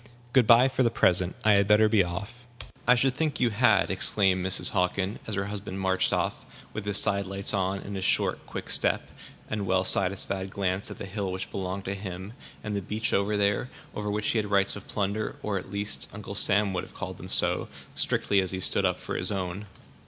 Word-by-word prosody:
Good 130 -5 +5
by 120 +2 +8
for 130 - 0
the 120 - +4
present; 90 -5 +3
I 110 - +6
had 100 -1 +4
better 105 +1 +6
be 105 -2 +4
off." 100 +8 -6 0.4
"I 125 - +7
should 130 +1 +2
think 155 +2 -1
you 120 -2 +3
had," 105 -3 +3
exclaimed 95 0 +2
Mrs. 95 0 0
Hockin, 95 +3 0
as 110 - -3
her 100 0 -1
husband 100 -1 -5
marched 95 -1 +1
off, - - -1 0.3
with 110 - -5
his 100 -1 +1
side 100 -1 0
lights 95 +2 -1
on, 95 -1 0
and 100 - -6
his 95 - -3
short, - - +1
quick - - -6
step, - - +1 0.4
and 105 -2 -3
well 95 0 +2
satisfied 95 0 0
glance 95 0 -1
at - - -8
the - - -6
hill 100 0 -3
which 95 +1 -5
belonged 95 0 -4
to 95 - -2
him, 95 +1 -6 0.3
and 105 -1 -3
the 100 - -1
beach, 110 +4 -3
over 100 +3 +1 0.4
which 105 +1 -1
he 115 - +2
had 105 -1 -3
rights 100 -1 +2
of 100 - -10
plunder 105 +1 -2
or, 100 -2 -1
at 95 - -11
least, 100 +1 -3
Uncle 100 -1 -7
Sam 100 0 +3
would 90 - -2
have - - -13
called - - -6
them - - -9
so, - - 0 0.3
strictly 100 -1 +1
as 95 - -2
he 95 - -3
stood - - +1
up - - +1
for - - -5
his - - -1
own. 95 +1 -3
100 Hz, 215 wpm, -27 LUFS, 95-105 Hz, 0.4 s, by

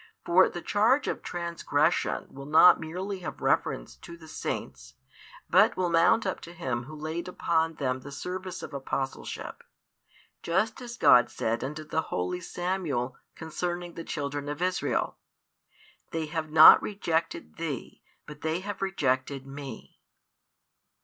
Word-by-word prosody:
For 185 +2 +5
the 175 - -7
charge 230 +7 +3
of - - -2
transgression 170 -2 0
will 140 0 -9
not 160 +4 +7
merely 185 +5 -5
have 180 - -7
reference - - 0
to 170 0 -11
the 160 -1 -14
Saints, 65 - -5 0.5
but - - +4
will 180 -2 0
mount 170 +7 +4
up 190 - -2
to 170 - -10
Him 125 -8 -3
Who 155 +4 -9
laid 155 +3 -4
upon 165 -2 0
them 130 -3 -1
the 140 +2 -10
service 185 +5 -5
of - - -8
apostleship; 135 -1 -4 0.8
just 210 +8 0
as 240 -1 -7
God 120 - +6
said 115 +1 -2
unto 150 +4 -5
the 155 +1 -1
holy 90 - -3
Samuel 170 -9 -2 0.2
concerning 175 +2 -4
the 165 - -7
children 145 -1 -4
of 145 - -4
Israel: 180 0 -1 0.9
They 165 -1 -2
have 155 0 -4
not 155 +1 +9
rejected 165 - -2
thee, - - -5 0.2
but 150 0 -11
they 160 +3 -1
have 205 +2 -6
rejected 135 -7 -1
Me. 135 -3 -9
160 Hz, 145 wpm, -28 LUFS, 140-180 Hz, 0.9 s, not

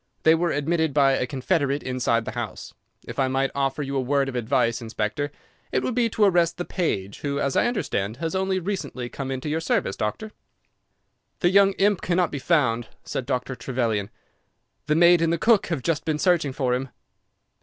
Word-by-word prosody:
They 160 - +6
were 170 +1 +1
admitted 160 0 0
by 140 -2 +5
a 130 -1 0
confederate 140 +1 0
inside 120 -3 0
the - - -4
house. - - -6 0.3
If - - -6
I 135 - +3
might 135 +1 0
offer 140 +1 -1
you 140 0 -4
a 135 - +1
word 135 +1 +1
of 130 - -7
advice, 115 0 +1
Inspector, 110 +5 -3 0.4
it - - 0
would 255 - -1
be 235 -1 +2
to 215 - 0
arrest 175 -4 +3
the 175 - -3
page, 100 - -2
who, 140 -1 -2
as 140 -2 -1
I - - +3
understand, 110 - -2
has 165 +3 -3
only 190 0 0
recently 180 -10 -4
come 135 +1 -5
into 130 +2 -4
your 155 +2 -1
service, 95 -10 0
Doctor." 210 - -3 1.1
"The 175 - +3
young 195 0 +5
imp 200 -1 +2
cannot 180 -1 +1
be 140 - -4
found," 125 -7 +1 0.2
said 130 - -4
Dr. 130 0 -2
Trevelyan; 115 -5 -2 0.8
"the 150 - +2
maid 170 +1 +6
and 165 0 +2
the 170 - +1
cook 220 +4 +3
have 160 -7 -3
just 155 -2 0
been 155 -2 -1
searching 170 -4 +2
for 130 -2 0
him." 130 +1 -2
140 Hz, 195 wpm, -24 LUFS, 130-170 Hz, 1.1 s, They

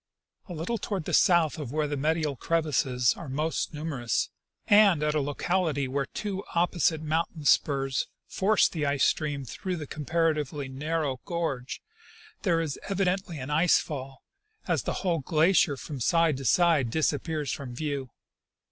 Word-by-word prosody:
''A 175 - -5
little 195 +9 -2
toward 190 -5 -3
the - - -4
south 170 -3 +4
of 140 -6 -5
where 155 +1 0
the 145 - -2
medial 155 0 0
crevasses 130 -5 +1
are 165 - -8
most 155 +4 -1
numerous, 150 -7 -2 0.3
and 205 -7 +5
at 150 0 +1
a 155 - +1
locality 145 0 0
where 135 +1 -2
two 200 -2 -4
opposite 170 -2 +1
mountain 155 0 -2
spurs 135 -2 +2 0.2
force 205 +2 +3
the 160 -3 -4
ice 140 -1 +1
stream 145 -3 -1
through 185 +8 -4
the 155 -3 -5
comparatively 150 -2 -1
narrow 145 0 -2
gorge, 165 -8 -3 0.6
there 170 -2 +2
is 155 -4 -3
evidently 190 -3 -1
an 135 +1 -6
ice 160 +4 +4
fall, 135 -2 -6 0.4
as - - +1
the - - -3
whole 170 -3 +2
glacier 155 +1 +3
from 140 +1 -7
side 165 +4 +3
to 135 - -7
side 155 0 +3
disappears 150 +1 -1
from 125 -3 -6
view. 140 -2 -3
155 Hz, 155 wpm, -27 LUFS, 140-170 Hz, 0.6 s, and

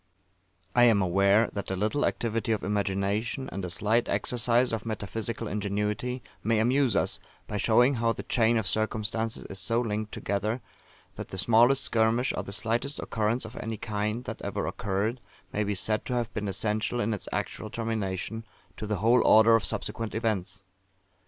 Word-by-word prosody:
I 120 0 +7
am 115 -4 +5
aware 100 +4 +3
that 100 - -5
a 95 - -1
little 110 +10 +1
activity 115 0 -1
of 110 - -3
imagination, 100 +5 -1
and 100 - -5
a 90 - -3
slight 110 +7 +1
exercise 120 +1 +2
of 110 -1 -2
metaphysical 110 +1 -4
ingenuity, 105 +5 -2 0.2
may 115 0 +2
amuse 125 +3 +2
us, - - +1 0.3
by 105 - -4
showing 120 +6 +4
how 115 -2 +1
the - - -5
chain 115 -1 +2
of 110 - -1
circumstances 110 +2 -1
is 95 - -3
so 115 +6 +2
linked 110 -2 -2
together, 105 +4 -2 0.6
that - - -6
the 95 - -7
smallest 120 +7 +4
skirmish, 115 +2 +2
or - - -2
the - - -8
slightest 115 +7 0
occurrence 110 +2 -1
of 110 +2 -9
any 110 0 -4
kind, 105 +2 -2
that - - -7
ever - - -3
occurred, 105 +5 -2 0.3
may 105 - 0
be 105 0 -1
said 110 +3 0
to 125 - -2
have 120 -2 -2
been 105 -1 -3
essential, 110 +4 0
in 115 -1 0
its 105 - -4
actual 110 - -3
termination, 110 -1 -3 0.3
to 110 - -5
the 105 - 0
whole 120 +2 +5
order 110 +1 +7
of 115 - +2
subsequent 110 +5 -3
events. 100 -4 -2
110 Hz, 175 wpm, -28 LUFS, 105-115 Hz, 0.6 s, I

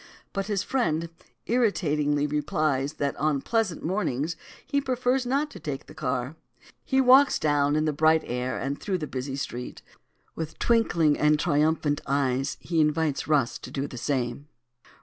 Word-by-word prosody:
But 195 -1 -2
his 200 -2 0
friend 165 -11 0 0.4
irritatingly 150 -11 +1
replies 150 -1 0
that 140 -2 -2
on 150 -1 +1
pleasant 225 -7 0
mornings 165 -4 -1 0.3
he 280 - 0
prefers 255 -1 0
not 285 +4 0
to - - -10
take 145 -4 -5
the - - -13
car. 125 +3 -3 0.5
He 265 - +1
walks 265 +2 +6
down 145 -1 +2
in 155 0 +1
the 155 - 0
bright 155 +2 +3
air 125 +1 -2
and 140 +1 -3
through 195 -3 -1
the 160 - -4
busy 135 -1 -4
street. 125 -2 -6 0.5
With 160 -1 -6
twinkling 170 -10 +2
and 150 0 +4
triumphant 150 -1 +1
eyes 135 -1 0
he 165 -2 0
invites 150 -1 0
Rus 145 -6 +1
to - - -9
do 135 +1 -3
the 135 - -8
same. 125 +1 -2
150 Hz, 160 wpm, -26 LUFS, 140-190 Hz, 0.5 s, walks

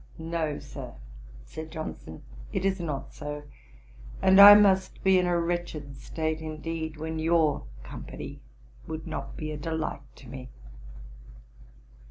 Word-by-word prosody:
"No, 160 -2 -2
Sir, - - -9 0.5
(said 155 - -8
Johnson,) 155 - -7 0.3
it 185 - -1
is 195 0 +1
not 150 -5 -4
so; 150 0 -6 0.8
and 190 +1 +7
I 205 +1 +13
must 195 -2 +3
be 190 -1 +5
in 180 - +1
a 175 -1 +2
wretched 170 -4 -3
state, 160 +3 -3
indeed, 160 0 -5
when 160 +1 -4
your 160 - +2 0.2
company - - -8 0.5
would 160 0 -5
not - - -6
be 155 0 -4
a 150 - -4
delight 160 -1 -3
to 130 - -14
me." 130 0 -8
160 Hz, 135 wpm, -28 LUFS, 150-175 Hz, 0.8 s, I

